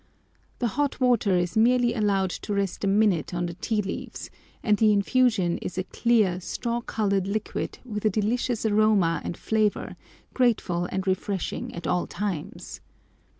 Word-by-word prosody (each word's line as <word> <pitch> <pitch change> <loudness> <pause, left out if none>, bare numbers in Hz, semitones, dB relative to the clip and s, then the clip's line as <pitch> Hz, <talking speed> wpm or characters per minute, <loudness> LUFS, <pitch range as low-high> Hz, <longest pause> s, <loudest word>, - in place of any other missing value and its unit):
The 240 - 0
hot 285 -2 -1
water 240 -7 +3
is 175 +3 -1
merely 240 +2 +4
allowed 200 -4 +1
to 205 - -4
rest 200 -1 -2
a - - +1
minute 195 -5 +2
on 175 0 -1
the 170 - -4
tea 210 +4 -1
leaves, 195 - -6 0.3
and 210 - +4
the 220 -1 +5
infusion 205 -3 +2
is - - -6
a 185 - 0
clear 210 -4 +2
straw 235 +5 -3
coloured 200 -5 0
liquid 215 +2 -3
with 210 -4 -5
a - - +5
delicious 225 +3 -1
aroma 205 -6 +3
and 170 - -4
flavour, 215 -2 0 0.4
grateful 210 -8 +1
and 190 0 -2
refreshing 190 0 -2
at 170 - -7
all 180 - 0
times. 185 -5 -5
205 Hz, 155 wpm, -26 LUFS, 185-225 Hz, 0.4 s, the